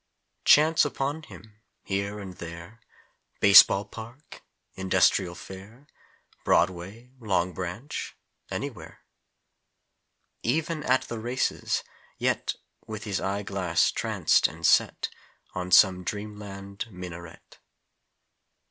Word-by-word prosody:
Chance 155 +2 +6
upon 145 +2 -2
him, 105 -7 -15 0.2
here 100 +1 -3
and 95 -2 -8
there 85 +6 -9 0.6
Base 100 -1 +11
ball 100 +1 -2
park 115 +7 -11 0.3
Industrial 95 -1 +2
Fair 100 +9 -12 0.6
Broadway 95 +7 0
Long 95 -5 0
Branch 95 - -6 0.3
anywhere! - - -6 1.4
Even 155 +5 -1
at 130 -2 +2
the 115 - -6
races, 120 +3 -1 0.3
yet - - -1 0.3
With 110 0 -6
his 100 -4 -2
eye 100 +1 -2
glass 95 -4 +1
tranced - - +2
and - - -7
set - - +3 0.4
On 90 0 -4
some 90 0 +6
dream 105 +2 -5
land 100 +1 -7
minaret. 85 -3 -10
100 Hz, 105 wpm, -27 LUFS, 90-115 Hz, 1.4 s, Base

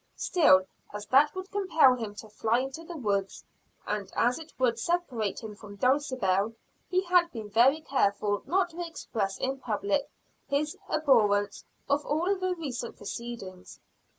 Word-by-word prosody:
Still, 185 - +4 0.3
as 210 0 -5
that 290 +4 +5
would 375 +1 -6
compel 325 -10 +4
him 220 -4 -6
to 220 - -9
fly 220 +2 0
into 270 +5 -6
the 335 0 -8
woods, 200 -6 -2 0.4
and 205 -2 -3
as 245 +4 +2
it 320 0 -11
would 240 -3 +1
separate 245 - -1
him 215 -1 -6
from 205 0 -11
Dulcibel, 235 -6 +1 0.4
he 370 0 +2
had 355 -1 +3
been 215 -3 -7
very 265 +8 +4
careful 205 -7 0
not 365 0 +1
to 345 +2 -5
express 215 - -3
in 265 +1 -2
public 220 +2 -1 0.4
his 295 +2 -1
abhorrence 210 -9 +2 0.2
of 285 +1 +1
all 340 +7 0
the 370 -1 -1
recent 260 -8 -5
proceedings. 200 -4 -8
255 Hz, 150 wpm, -28 LUFS, 210-315 Hz, 0.4 s, that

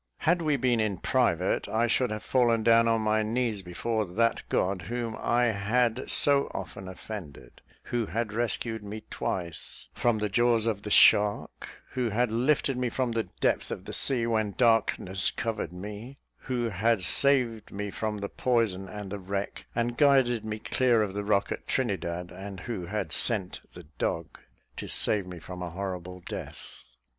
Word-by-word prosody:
Had 170 +2 +2
we 150 -3 +1
been 125 -2 +1
in 105 -3 0
private, - - +1
I 115 +2 +1
could 125 +2 +1
have 105 -2 -5
fallen 120 -2 +2
down 115 0 +5
on 115 -1 +2
my 110 0 +2
knees 110 -1 -1
before 110 +5 -2
that 110 +5 0
God 95 0 0
whom 115 +4 -4
I 120 0 +2
had 115 +4 0
so 140 -1 +5
often 95 +1 -6
offended; 95 -5 -9 0.2
who 120 -3 -2
had 115 -1 -3
rescued 115 -1 -2
me 105 +1 -7
twice 85 -4 -4
from 120 -2 +1
the 105 0 -1
jaws 115 +2 +2
of 110 -3 -1
the 105 - -6
shark; 105 0 +3
who 125 -2 -1
had 120 +2 0
lifted 130 +3 +1
me 125 -1 0
from 125 0 -1
the 115 -5 -2
depth - - +1
of 95 - -6
the - - -7
sea 125 -4 +2
when 110 -3 0
darkness 110 -5 +2
covered 115 -7 -3
me; 105 +8 -8 0.3
who 120 -3 -1
had 110 +1 +1
saved 125 -2 +3
me 100 0 -4
from 110 +1 -3
the 100 0 -4
poison 110 -6 0
and 105 -2 -7
the 100 - -4
wreck, 100 +1 -4
and 120 0 -1
guided 130 -6 +4
me 110 0 -4
clear 120 0 +2
of 100 -2 -4
the 105 +1 -3
rock 100 -1 +1
at - - -5
Trinidad; 85 +1 -2
and 95 +1 -8
who 100 -8 -5
had 100 -5 -3
sent 105 -7 +3 0.2
the 90 - -10 0.2
dog 85 -1 -3 0.4
to - - -5
save 100 -3 +2
me 90 -1 -8
from 90 +2 -9
a 90 - -4
horrible 90 0 -6
death. - - -8
110 Hz, 175 wpm, -28 LUFS, 100-120 Hz, 0.4 s, down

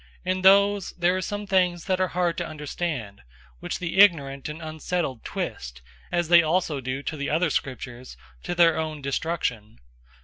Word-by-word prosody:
In 185 0 0
those, 200 +1 +4
there 175 +1 +2
are 185 - -1
some 205 +3 -4
things 180 -3 +1
that 185 -1 0
are 185 - +2
hard 175 -2 +1
to - - -3
understand, 150 - -5 0.4
which - - -4
the 175 +1 -3
ignorant 140 -8 +4
and 150 +2 -7
unsettled 155 -4 -3
twist, 60 0 -5 0.3
as 175 -1 0
they 170 +1 +7
also 160 -3 0
do 130 +2 -4
to 155 - -4
the 140 -1 -3
other 165 +1 +1
Scriptures, 125 - -5 0.2
to 175 - -4
their 170 -2 +4
own 155 -2 -4
destruction. 135 - -2
165 Hz, 170 wpm, -25 LUFS, 140-180 Hz, 0.4 s, they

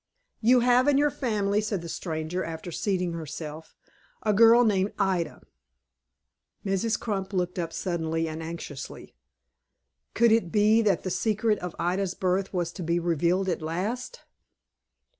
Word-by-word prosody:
"You 245 +2 +5
have 250 +2 +4
in 285 -2 +4
your 290 +1 +3
family," 210 -6 0
said 210 -5 -3
the - - -6
stranger, 165 +1 -3
after 165 +2 -6
seating 180 -1 -1
herself, 155 0 -7 0.5
"a 210 - +2
girl 230 +3 +7
named 200 -2 +1
Ida." 175 -5 -1 1.2
Mrs. 200 +3 0
Crump 200 -3 -3
looked 180 -1 -1
up 165 -1 -2
suddenly 165 -2 -2
and 160 0 -5
anxiously. 160 -4 -7 1.0
Could 235 -1 +5
it 220 -7 +2
be 215 +2 +4
that 200 -5 +1
the 185 - -3
secret 215 +1 +1
of 180 -1 -6
Ida's 180 +2 -1
birth 185 +1 0
was 175 -3 -1
to 180 - -8
be 170 +1 +1
revealed 175 +3 +1
at 175 - -1
last! 210 - -3
185 Hz, 145 wpm, -27 LUFS, 170-215 Hz, 1.2 s, girl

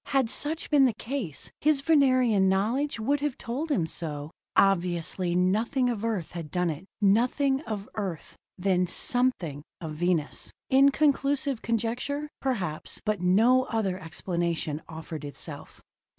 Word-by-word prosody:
Had 265 -5 +1
such 310 +3 -1
been 285 -3 +6
the 240 -5 +1
case, 225 - -3
his 300 -2 +3
Venerian 255 -10 +4
knowledge 230 +9 0
would 280 +6 +1
have 285 -2 -2
told 270 +8 -4
him 190 - +1
so. 155 -2 -5 0.2
Obviously, 175 -1 +2
nothing 225 +8 +2
of 220 -3 -4
Earth 215 -8 -2
had 170 -3 -6
done 180 0 0
it, 160 +6 -8
nothing 250 +7 +3
of 210 -2 -4
Earth 190 -7 -5 0.2
then 180 -1 +1
something 185 - 0 0.2
of 160 -3 -5
Venus! 165 -1 -1 0.2
Inconclusive 275 -1 +3
conjecture, 245 +6 -2
perhaps, 190 - -2
but 210 -3 0
no 230 +8 +4
other 195 -5 -1
explanation 170 -3 -2
offered 160 -1 -7
itself. 145 -1 -8
215 Hz, 135 wpm, -27 LUFS, 175-265 Hz, 0.2 s, been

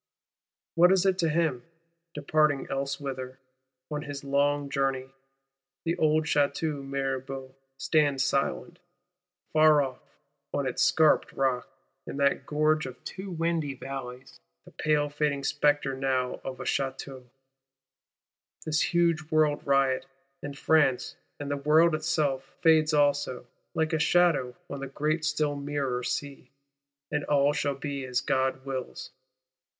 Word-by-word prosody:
What 175 +2 +6
is 190 0 +3
it 190 -1 +2
to 165 -3 +2
him, 150 -6 0 0.5
departing 150 -1 +1
elsewhither, 135 -1 -4 0.5
on 150 0 -2
his 145 -2 -7
long 140 +1 +1
journey? 135 -1 -1 0.7
The 165 +1 +1
old 155 0 +3
Château 145 0 0
Mirabeau 135 -1 -4 0.2
stands 145 -3 +2
silent, 145 +5 -1 0.7
far 155 -2 +6
off, 130 -2 -6 0.6
on 140 - 0
its 130 - -2
scarped 160 -2 +4
rock, 130 -2 0 0.4
in - - -6
that 140 -1 +1
"gorge 155 0 +1
of 130 - -11
two 190 +1 -7
windy 165 -4 -1
valleys;" 130 - -8 0.3
the - - -14
pale 150 -1 +1
fading 145 -1 -1
spectre 145 -1 +1
now 130 -1 -1
of 130 -1 -6
a - - -4
Château: 130 -1 -3 1.4
this 155 -1 +1
huge 170 -2 +1
World 155 -2 +2
riot, 135 -1 +2 0.3
and 145 -1 -7
France, 145 -6 +2 0.2
and 145 -1 -4
the 145 - 0
World 155 +4 +4
itself, 155 -4 0 0.2
fades 160 -1 +5
also, 145 -4 +1 0.3
like 160 0 0
a 160 - +1
shadow 165 -7 +3
on 140 - -6
the 135 - -5
great 155 +4 -1
still 155 -1 0
mirror 140 -3 -2
sea; 135 0 -4 0.6
and 150 -1 -1
all 145 0 +3
shall 145 -4 -1
be 140 0 -4
as 125 0 -1
God 130 0 0
wills. 130 -2 -5
145 Hz, 135 wpm, -28 LUFS, 135-155 Hz, 1.4 s, What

